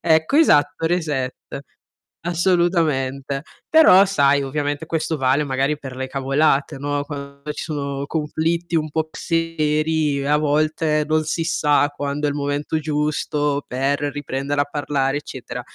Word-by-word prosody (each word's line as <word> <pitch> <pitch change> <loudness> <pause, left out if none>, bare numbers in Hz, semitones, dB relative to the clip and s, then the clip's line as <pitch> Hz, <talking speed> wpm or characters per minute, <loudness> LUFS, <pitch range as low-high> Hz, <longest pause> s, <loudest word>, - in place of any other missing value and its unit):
Ecco, 160 - +2
esatto, 150 - +4
reset. 150 -7 -1 0.9
Assolutamente. 160 -6 +1 0.3
Però 200 -12 +7
sai, 140 -6 +3
ovviamente 145 +2 -2
questo 160 -1 -2
vale 135 +2 +2
magari 135 +1 0
per 135 -3 -8
le 130 0 -3
cavolate, 135 +1 +1
no, 145 +1 -2
quando 140 -1 -8
ci 150 - -6
sono 140 -3 -3
conflitti 165 +3 -2
un 155 0 -2
po' 160 - -2
un - - +2
po' 155 - -24
più - - -10
seri 155 -3 0
a 150 +1 +3
volte 155 +1 +1
non 155 0 +1
si 165 +2 -1
sa 150 -4 +2
quando 145 +1 -3
è - - +1
il 145 - -4
momento 145 +2 -2
giusto 150 -1 -1
per 135 +3 0
riprendere 145 0 -2
a - - +3
parlare, 145 -1 -1
eccetera. 130 -3 -7
145 Hz, 150 wpm, -21 LUFS, 140-160 Hz, 0.9 s, Però